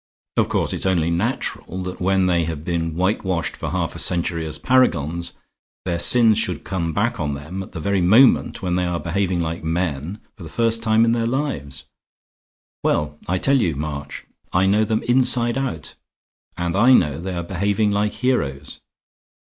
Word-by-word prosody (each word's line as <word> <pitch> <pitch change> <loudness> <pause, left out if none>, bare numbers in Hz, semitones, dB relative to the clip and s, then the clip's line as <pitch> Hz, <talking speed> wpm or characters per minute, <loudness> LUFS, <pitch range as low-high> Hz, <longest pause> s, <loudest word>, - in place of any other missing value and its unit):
Of - - +2
course - - 0
it's - - -2
only 85 -3 +1
natural 95 -1 -3
that 90 0 -6
when 95 0 +2
they 85 -2 +2
have 80 -2 -5
been 85 -2 -2
whitewashed 95 -2 -1
for - - -5
half - - -2
a - - -7
century 85 -2 -2
as 80 - -5
paragons, 85 - +1 0.5
their 85 -2 -1
sins 110 +3 +5
should 90 -9 -2
come 85 -4 -2
back 105 +7 -1
on 75 -3 -2
them 75 +7 -6
at 95 - -10
the 85 - -5
very 100 +3 0
moment 110 +5 +4
when 90 -1 0
they 90 - 0
are 90 -1 -2
behaving 90 0 -1
like 80 0 -4
men 80 +2 -2 0.2
for 100 - -16
the 80 - -8
first 115 +3 0
time 110 0 +3
in 115 - +2
their 115 -1 0
lives. 95 - -3 1.0
Well, 75 0 0
I 95 - 0
tell 135 +6 +2
you, 80 -7 0
March, 70 -1 -6 0.3
I 90 +2 +2
know 105 +3 +3
them 110 +1 -1
inside 120 -1 +3
out; 130 - -4 0.6
and 90 -1 -2
I 120 +6 +5
know 75 - +3
they 90 +1 -4
are 85 - -3
behaving 100 +4 0
like 105 +1 0
heroes. 75 - -2
90 Hz, 180 wpm, -21 LUFS, 80-110 Hz, 1.0 s, sins